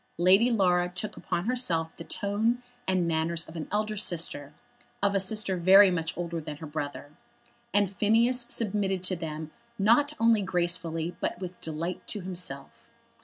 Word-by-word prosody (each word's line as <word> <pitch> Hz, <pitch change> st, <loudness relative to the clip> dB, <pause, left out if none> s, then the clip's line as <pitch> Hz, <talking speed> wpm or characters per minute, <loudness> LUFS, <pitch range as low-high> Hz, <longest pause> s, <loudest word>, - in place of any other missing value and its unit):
Lady 190 Hz, +7 st, +5 dB
Laura 180 Hz, -6 st, +2 dB
took 185 Hz, +4 st, -2 dB
upon 175 Hz, 0 st, -3 dB
herself 175 Hz, -10 st, -1 dB
the 165 Hz, -, -9 dB
tone 220 Hz, +7 st, -1 dB, 0.2 s
and 185 Hz, -2 st, +1 dB
manners 165 Hz, +1 st, -1 dB
of 160 Hz, -, -12 dB
an 160 Hz, -, -5 dB
elder 215 Hz, +1 st, -1 dB
sister, 165 Hz, -7 st, 0 dB, 0.5 s
of 200 Hz, 0 st, +3 dB
a 195 Hz, -, +2 dB
sister 195 Hz, -1 st, +1 dB
very 190 Hz, +3 st, +7 dB
much 165 Hz, -2 st, -3 dB
older 170 Hz, -1 st, -3 dB
than 150 Hz, -1 st, -7 dB
her 160 Hz, -, -8 dB
brother, 145 Hz, -1 st, -6 dB, 0.6 s
and 205 Hz, -1 st, +3 dB
Phineas 230 Hz, +5 st, +2 dB
submitted 200 Hz, -5 st, +1 dB
to 185 Hz, 0 st, 0 dB
them 155 Hz, -2 st, -6 dB, 0.3 s
not 240 Hz, +9 st, +3 dB
only 230 Hz, -2 st, +4 dB
gracefully 175 Hz, -2 st, -1 dB
but -, -, -3 dB
with 180 Hz, -1 st, -8 dB
delight 165 Hz, +3 st, -5 dB
to 210 Hz, -, -3 dB
himself. 175 Hz, -7 st, -6 dB
180 Hz, 160 wpm, -28 LUFS, 165-205 Hz, 0.6 s, very